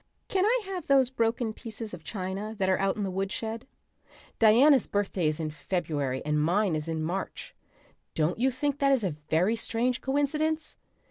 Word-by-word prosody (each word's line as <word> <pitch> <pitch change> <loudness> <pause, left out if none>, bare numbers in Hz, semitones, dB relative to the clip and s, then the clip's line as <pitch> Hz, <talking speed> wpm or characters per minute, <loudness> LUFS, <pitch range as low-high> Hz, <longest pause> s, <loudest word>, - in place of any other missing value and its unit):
Can 380 0 +2
I - - +3
have 375 -4 -5
those 265 -2 +4
broken 230 -2 0
pieces 220 -1 -8
of 170 -3 -8
china 195 +2 -4
that 190 -2 0
are 190 - +2
out 195 0 +1
in 210 - -3
the 190 - -2
woodshed? 220 +5 -3 0.7
Diana's 250 +5 +6
birthday 195 -4 0
is 155 +1 -1
in 155 -1 -2
February 150 -6 -2
and 150 0 +1
mine 180 +3 +2
is 155 +1 -3
in 160 -1 -2
March. 180 +4 -4 0.6
Don't 160 +6 0
you 260 +2 +3
think 285 +2 -2
that 275 -1 +3
is 265 -5 +3
a 180 -6 -1
very 180 +8 +3
strange 235 +2 -1
coincidence? 305 +3 0
215 Hz, 180 wpm, -28 LUFS, 180-260 Hz, 0.7 s, Diana's